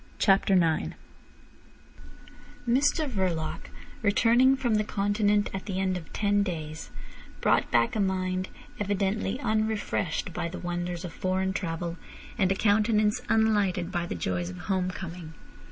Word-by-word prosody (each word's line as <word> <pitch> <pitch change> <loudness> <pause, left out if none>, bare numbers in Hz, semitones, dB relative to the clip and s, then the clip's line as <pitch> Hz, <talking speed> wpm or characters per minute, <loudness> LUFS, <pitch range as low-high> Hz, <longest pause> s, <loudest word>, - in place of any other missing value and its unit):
CHAPTER 195 0 +4
IX 165 -3 +2 1.7
Mr 290 +6 +2
Verloc 185 - -2 0.3
returning 235 +5 +4
from 245 -4 0
the 215 0 +3
Continent 205 0 +1
at 195 +1 -5
the 190 -2 -2
end 190 -1 +1
of 175 -3 -7
ten 205 -1 +2
days, 160 -5 -4 0.5
brought - - +2
back 115 -1 +2
a - - 0
mind 185 -1 0 0.3
evidently 205 +2 -1
unrefreshed 215 - -1
by 170 - -2
the 175 - -6
wonders 175 0 -3
of 170 - -7
foreign 190 +1 -1
travel 170 -2 -3 0.4
and 190 -2 +2
a - - +2
countenance 210 +1 +2
unlighted 205 -5 +2
by 175 -2 -2
the - - -4
joys 90 +1 -2
of 90 - -8
home 185 - -1
coming. 170 -3 -7
190 Hz, 135 wpm, -28 LUFS, 175-210 Hz, 1.7 s, CHAPTER